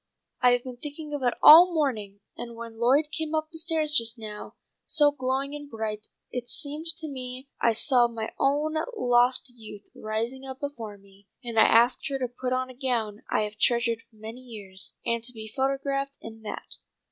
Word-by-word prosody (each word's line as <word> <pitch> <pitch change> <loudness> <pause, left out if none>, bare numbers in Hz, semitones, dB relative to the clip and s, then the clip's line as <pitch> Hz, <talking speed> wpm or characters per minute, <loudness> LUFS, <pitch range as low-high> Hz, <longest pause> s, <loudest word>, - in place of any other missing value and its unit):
I 250 -1 +6
have 245 0 +1
been 255 -2 -8
thinking 295 +2 -7
of 290 - -3
it 245 -2 +1
all 345 +4 +10
morning, 215 -10 -1
and 235 -1 -7
when 230 -1 -9
Lloyd 280 +6 +3
came 320 -1 -2
up 310 0 -1
the 325 - -6
stairs 320 -2 +1
just 230 -3 +2
now, 215 -2 -8 0.3
so 295 -2 +5
glowing 270 +1 -2
and 290 -1 -7
bright, 215 -2 -4 0.2
it 245 -1 -5
seemed 305 +2 -3
to 320 -2 -5
me 260 -1 -6
I 230 - +3
saw 245 +1 +4
my 225 -2 -5
own 295 +3 +1 0.2
lost 245 0 +3
youth 215 -3 -11
rising 230 +5 -3
up 265 -1 -7
before 230 -8 -6
me, 200 0 -22 0.2
and 235 -2 -1
I - - +8
asked 235 +3 +4
her 275 - -2
to 255 -2 -2
put 250 +1 -5
on 255 0 -1
a - - -14
gown 235 -5 -2
I - - +2
have 210 0 -6
treasured 235 -1 +2
many 220 +3 -9
years, 205 -6 -5
and 235 -1 0
be 220 -1 -8
photographed 275 +1 -1
in 225 0 -10
that. 215 - -7
250 Hz, 190 wpm, -27 LUFS, 225-280 Hz, 0.3 s, all